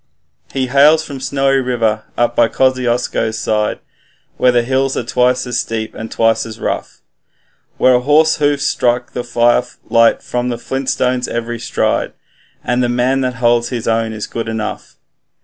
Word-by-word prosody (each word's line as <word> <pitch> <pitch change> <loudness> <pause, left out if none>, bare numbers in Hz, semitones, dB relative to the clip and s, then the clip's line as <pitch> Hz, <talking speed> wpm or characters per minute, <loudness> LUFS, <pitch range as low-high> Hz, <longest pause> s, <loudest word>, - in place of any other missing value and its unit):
'He 135 -1 -1
hails 145 +5 +4
from 140 -3 -7
Snowy 135 +1 +1
River, 115 -4 0
up 120 0 +1
by 120 - +4
Kosciusko's 125 -3 0
side, 105 -1 -1 0.6
Where 125 - +4
the 120 -1 +2
hills 135 +2 0
are - - -1
twice 125 +2 +1
as 125 -1 -2
steep 110 -1 -4
and 110 0 -7
twice 115 0 +2
as 110 -1 -9
rough, - - -4 0.8
Where 130 - +4
a 125 - +4
horse's 150 +5 +3
hoofs 145 -2 +1
strike 120 0 0
firelight 120 -1 +1
from 125 0 -2
the 120 - -3
flint 135 +3 -4
stones 125 0 0
every 120 0 -4
stride, 120 - -1 0.5
The 125 0 +1
man 125 +2 +1
that 125 -1 -2
holds 120 0 +2
his 120 -3 -4
own 115 0 0
is 110 -1 -5
good 115 -1 -5
enough. 110 -1 -5
125 Hz, 160 wpm, -16 LUFS, 115-130 Hz, 0.8 s, hails